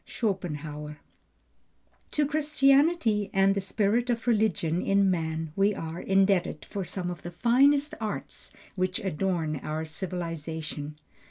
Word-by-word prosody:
SCHOPENHAUER. 150 -8 -3 1.1
To 295 - +1
Christianity 280 - +3
and 195 0 +5
the 200 - -1
spirit 215 +5 0
of 235 -1 -1
religion 205 -7 +1
in 195 -1 +3
man 160 -2 -2
we 200 +1 +3
are 165 +1 -5
indebted 190 -4 +2
for 200 - -4
some 180 0 -4
of 175 - -8
the 175 - -6
finest 275 - +3
arts 215 -2 -5 0.2
which 185 -1 0
adorn 170 -4 -1
our 155 +3 -4
civilization. 160 -3 -5
190 Hz, 120 wpm, -28 LUFS, 160-220 Hz, 1.1 s, and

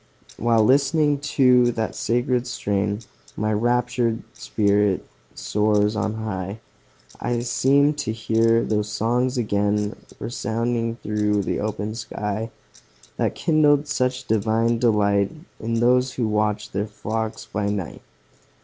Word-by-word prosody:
While 115 -1 +3
listening 145 +4 +3
to 125 -4 +4
that 110 -1 -2
sacred 125 +1 0
strain, 100 -2 -1 0.4
My 110 +1 0
raptured 120 +1 0
spirit 100 -2 +1 0.3
soars 105 0 +1
on 110 0 -1
high; 100 -2 -4 0.6
I 120 0 -1
seem 140 +4 +3
to 145 -7 -3
hear 115 +1 +2
those 105 -1 -1
songs 120 +4 0
again 105 -1 0 0.2
Resounding 115 0 -2
through 105 -1 0
the - - -2
open 105 0 -3
sky, 110 -1 -4 0.7
That - - 0
kindled 150 -3 +3
such 130 -2 -1
divine 110 +2 +1
delight, 100 -4 +2 0.3
In 115 +1 -2
those 125 +2 +3
who 120 -3 -1
watched 105 0 -1
their 100 +2 -1
flocks 110 +1 -4
by 105 -1 -2
night. 100 -5 -4
110 Hz, 120 wpm, -23 LUFS, 105-120 Hz, 0.7 s, to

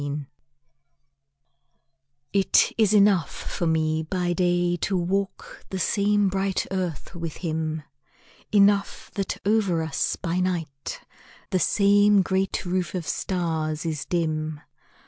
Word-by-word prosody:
ENOUGH 145 0 -4 2.1
IT 195 -2 +4
is 220 -4 +3
enough 200 -6 +4
for 175 - -4
me 160 -1 +1
by 175 +2 -1
day 175 -1 +1
To 190 +2 -1
walk 195 +3 -3
the 190 - -3
same 205 +2 +2
bright 195 0 0
earth 180 -6 -3
with 165 -3 -5
him; 160 -1 -2 0.7
Enough 200 -1 +2
that 195 -2 -2
over 200 -6 +2
us 160 -3 -1
by 175 -1 -2
night 165 -7 -3 0.5
The 185 - +2
same 205 +1 +4
great 190 +1 -1
roof 180 +1 -1
of 175 -3 -3
stars 160 -4 -2
is 155 -4 -2
dim. 155 -3 -2
180 Hz, 120 wpm, -25 LUFS, 160-195 Hz, 2.1 s, IT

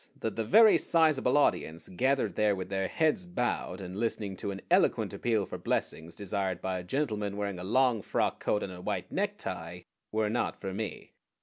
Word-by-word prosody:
that 110 - -3
the 115 - -1
very 215 - +7
sizable 155 -5 +3
audience 80 - +1
gathered 130 +2 +1
there 105 -1 +2
with 95 -1 -5
their 95 -1 -1
heads 160 - +1
bowed, 120 - -2
and 95 -1 -7
listening 110 -4 -2
to 100 - -4
an 95 -1 -4
eloquent - - +3
appeal 110 -4 0
for - - -7
blessings 80 +1 -2
desired 95 -2 -2
by 95 -1 -2
a - - -7
gentleman 105 -3 -2
wearing 100 -3 -3
a - - -6
long 120 +2 +2
frock - - -1
coat 105 - 0
and 95 - -5
a 90 - -9
white - - -3
necktie, - - -3 0.3
were 110 0 +1
not 115 +3 -1
for 95 - -4
me. 105 +2 -5
105 Hz, 190 wpm, -30 LUFS, 95-125 Hz, 0.3 s, very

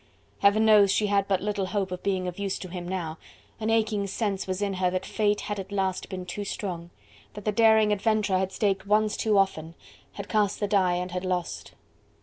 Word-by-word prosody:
Heaven 205 +2 +4
knows! 210 -3 +6
she 210 - +2
had 200 -1 +1
but 190 -2 +1
little 205 -2 -1
hope 195 -2 -2
of 180 - -5
being 190 -2 -1
of 180 +2 -6
use 200 -1 -2
to 185 - -8
him 175 -1 -6
now: 170 -4 -4 0.4
an 220 0 -2
aching 215 -3 +1
sense 195 -1 -2
was 185 0 -2
in 200 -1 -1
her 185 -1 +1
that 185 0 -3
fate 210 -1 0
had 205 -1 -4
at 195 +1 -7
last 190 -2 -1
been 185 -2 -5
too 205 +3 -5
strong! 180 -4 -5 0.5
that 210 - -9
the 210 - +2
daring 220 -1 +4
adventurer 210 -2 +1
had 190 0 -1
staked 195 0 -1
once 210 +1 +2
too 215 -2 +1
often, 165 -4 0 0.4
had 200 0 -7
cast 210 -2 +1
the 205 - 0
die 190 -3 +2
and 180 +1 -3
had 180 +1 -3
lost. 175 - -3
195 Hz, 215 wpm, -26 LUFS, 185-210 Hz, 0.5 s, knows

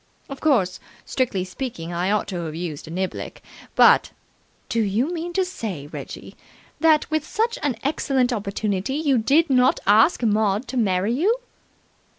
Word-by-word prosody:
Of 275 -1 -8
course, 200 -12 +2 0.3
strictly 235 -8 -1
speaking, 180 -5 -6
I 175 +2 -1
ought 210 0 +1
to 175 -3 -4
have 155 -1 -6
used 165 -4 -5
a - - -9
niblick, 185 +3 -4 0.3
but - - +6 0.3
" - - -39
"Do 230 - +1
you 225 - 0
mean 345 +1 -4
to 375 +1 +1
say, 210 - -5
Reggie, 145 - -9 0.4
that, 315 -2 +3
with 310 -1 +1
such 455 +9 -1
an 280 -5 0
excellent 265 -3 +1
opportunity, 205 +2 -2
you 285 -5 +2
did 285 +7 +3
not 255 0 +4
ask 220 - +4
Maud 215 +1 +1
to 260 - -4
marry 200 -1 +1
you?" 390 - +2
230 Hz, 165 wpm, -23 LUFS, 190-285 Hz, 0.4 s, but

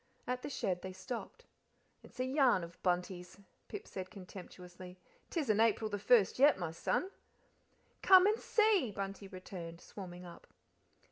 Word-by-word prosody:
At 250 0 -2
the - - -5
shed 185 -9 -2
they 190 0 -6
stopped. 230 +6 -7 0.6
"It's - - -17
a 255 - +1
yarn 260 - +3
of 170 0 -11
Bunty's," 180 0 -2 0.3
Pip 415 +1 -7
said 185 -1 -6
contemptuously. 180 -1 -11 0.3
"'Tisn't 230 - +1
April 220 -1 +2
the 205 - -2
first 210 +1 +4
yet, 290 +2 +6
my 175 -3 -3
son." 365 - -1 0.9
"Come 375 -1 +8
and 425 +2 +3
see," 425 - +3
Bunty 195 0 -5
returned, 180 -3 -8
swarming 180 -2 -9
up. 175 - -12
195 Hz, 145 wpm, -34 LUFS, 180-255 Hz, 0.9 s, Come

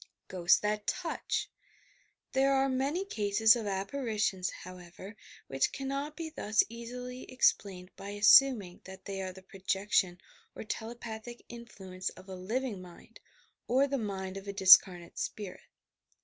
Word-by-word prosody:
GHOSTS 175 -2 +4
THAT 210 0 -2
TOUCH! 345 -3 -2 0.8
There 270 +1 +3
are 270 0 +3
many 275 +8 -1
cases 220 - +3
of 225 -3 -4
apparitions, 200 -2 -1
however, 185 +3 -11 0.3
which 135 0 0
cannot 275 +2 -4
be 325 -1 -5
thus 210 -8 +2
easily 250 +2 -8
explained 190 -7 +1
by 200 - -8
assuming 205 -1 +5
that 190 0 -11
they 195 -1 -4
are 185 -1 -4
the 190 +1 -14
projection 190 -1 0 0.4
or - - -7
telepathic 230 +1 -7
influence 190 -6 -7
of 185 +1 -15
a 190 - -7
living 215 +2 -3
mind, 175 -1 -14 0.5
or 265 +3 +3
the 275 -1 -2
mind 195 -3 -4
of 195 +1 -9
a 200 - -4
discarnate 185 -3 +6
spirit. 205 -4 -5
210 Hz, 135 wpm, -31 LUFS, 190-250 Hz, 0.8 s, discarnate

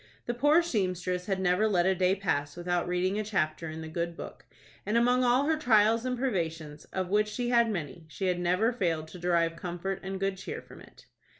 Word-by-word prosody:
The 240 - -1
poor 295 +7 +4
seamstress 185 - -1
never 190 +1 +2
let 180 -5 +2
a 190 - +4
day 185 +1 +2
pass 145 -7 -1
without 175 0 -1
reading 185 +3 0
a - - -1
chapter 165 -6 -1
in 160 +1 -6
the 160 - -6
good 170 +1 -3
book, - - -9 0.4
and, 215 +3 0
among 245 +2 +3
all 250 +3 +3
her 315 +1 +2
trials 225 -4 +3
and 250 -1 -1
privations, 165 - -3
of 185 -1 -4
which 210 +2 +2
she 240 +3 -3
had 235 -1 +4
many, 170 -4 -5
she 190 +5 -4
had 180 -1 +1
never 180 +7 +2
failed 165 -8 -1
to 180 - -10
derive 170 -1 +1
comfort 175 +3 -4
and 190 0 -5
good 195 0 -1
cheer 190 - -6
from - - -14
it. - - -17
190 Hz, 210 wpm, -29 LUFS, 175-220 Hz, 0.4 s, poor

